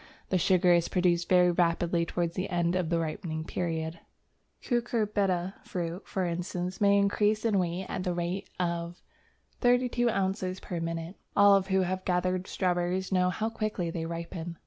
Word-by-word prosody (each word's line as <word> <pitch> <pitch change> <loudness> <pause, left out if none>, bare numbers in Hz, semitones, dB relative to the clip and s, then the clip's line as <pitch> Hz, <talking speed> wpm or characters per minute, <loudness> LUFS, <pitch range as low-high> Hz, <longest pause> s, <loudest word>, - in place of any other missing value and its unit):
The 185 - +2
sugar 180 +1 +4
is 170 -1 +3
produced 175 -2 +1
very 180 -1 +5
rapidly 170 -1 +1
towards 170 -1 -1
the 185 +1 -3
end 175 -1 +1
of 180 -3 0
the 170 - +1
ripening 160 0 -3
period. 165 -1 -3
A - - -29
Cucurbita 210 -6 0
fruit, 175 +1 -4
for 190 -2 -1
instance, 180 +2 -3
may 200 0 +5
increase 210 +2 +2
in 210 -4 +3
weight 180 +1 -2
at - - -3
the 180 -2 -1
rate 175 +2 -3
of·0032 235 +8 -1
ounce 190 -2 -1
per 175 - -5
minute. 165 +2 -4 0.2
All 200 -1 +7
who 190 0 +1
have 185 +1 -2
gathered 185 0 0
strawberries 180 +1 -1
know 180 -1 +3
how 220 +4 -2
quickly 215 -6 -2
they 165 -1 -3
ripen. 170 0 -6
180 Hz, 160 wpm, -29 LUFS, 170-195 Hz, 0.2 s, All